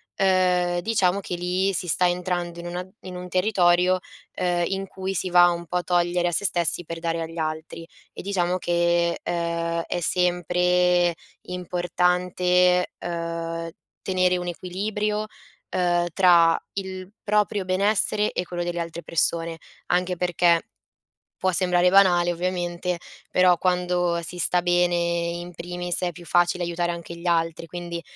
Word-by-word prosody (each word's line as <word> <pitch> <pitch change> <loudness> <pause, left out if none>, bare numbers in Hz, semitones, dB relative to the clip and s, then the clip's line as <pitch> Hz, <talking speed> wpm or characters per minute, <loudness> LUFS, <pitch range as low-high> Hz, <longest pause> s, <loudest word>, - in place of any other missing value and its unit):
ehm, 180 -2 +2
diciamo 195 -1 +1
che 180 -2 -5
lì 180 +2 0
si 180 +1 -2
sta 180 +2 +3
entrando 175 -1 -3
in 175 - -7
una 180 +1 -5
in 185 -1 -8
un 180 - -7
territorio, 185 -1 +3 0.3
ehm, 175 -1 0
in 195 0 -3
cui 190 0 -4
si 185 0 -1
va 175 0 +6
un 170 0 -3
po' - - -5
a 180 - -1
togliere 175 0 +1
a - - -4
se 185 +5 -1
stessi 175 -1 +2
per 165 0 -6
dare 165 0 -2
agli 165 +1 -6
altri. 160 +1 -4 0.3
E - - -7
diciamo 185 -2 0
che, 170 0 +1
ehm, 170 -1 -2
è 175 - -2
sempre 180 0 +2 0.3
importante, 180 0 +1
uhm, 165 -1 -4 0.3
tenere 185 -1 +1
un 180 0 -5
equilibrio, 210 +4 -2 0.4
ehm, 175 -1 +1
tra 170 -3 +5 0.2
il 190 -1 -6
proprio 210 -2 +1
benessere 205 +2 +1
e 180 - -3
quello 175 0 -4
delle 175 0 -3
altre 170 0 -5
persone. 165 0 0 0.3
Anche 180 +1 +1
perché, 175 -1 +2 0.8
può 185 - +3
sembrare 180 -1 +2
banale, 180 -3 +5
ovviamente, 175 0 -2 0.3
però 180 -1 +4
quando 180 -1 +1
si 175 +2 -5
sta 175 +1 +2
bene 175 0 +2
in 170 0 -2
primis, 175 +1 -4
è 175 -1 0
più 175 +1 -12
facile 175 +1 +2
aiutare 175 0 -1
anche 170 0 -8
gli 170 - -9
altri. 165 -1 0
Quindi 175 0 -6
175 Hz, 150 wpm, -24 LUFS, 170-180 Hz, 0.8 s, va